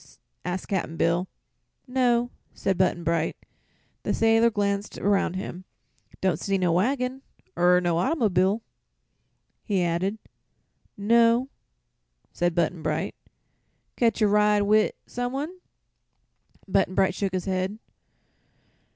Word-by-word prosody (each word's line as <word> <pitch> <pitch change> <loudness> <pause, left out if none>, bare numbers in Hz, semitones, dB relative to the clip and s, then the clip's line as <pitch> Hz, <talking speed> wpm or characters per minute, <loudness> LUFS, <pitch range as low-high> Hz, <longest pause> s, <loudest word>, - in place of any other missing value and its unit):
asked 180 +1 -4
Cap'n 175 -4 -2
Bill. 175 +2 +1 0.6
"No," 245 -2 +1 0.2
said 195 - 0
Button 180 -1 +1
Bright. 165 -1 0 0.6
The - - -1
sailor 225 +1 +4
glanced 200 -1 -2
around 200 -3 +1
him. 185 -1 -6 0.6
"Don't 190 -2 +1
see 195 -1 0
no 180 -2 +1
waggin, 250 +8 0 0.3
er 180 +1 +4
no 175 -2 0
autymob'l'," 205 - +1 1.0
he 195 -5 0
added. 175 +5 -1 0.8
"No," 230 +4 +3 0.8
said 175 -1 0
Button 170 0 0
Bright. 155 +5 -2 0.8
"Catch 230 -2 +2
a - - +5
ride 210 0 +3
wi' 215 +1 +3
some 245 +1 -4
one?" 300 +7 -4 1.1
Button 190 -1 +1
Bright 190 0 +3
shook 195 -1 -2
his 185 -1 -2
head. 190 +2 -1
195 Hz, 115 wpm, -26 LUFS, 180-225 Hz, 1.1 s, a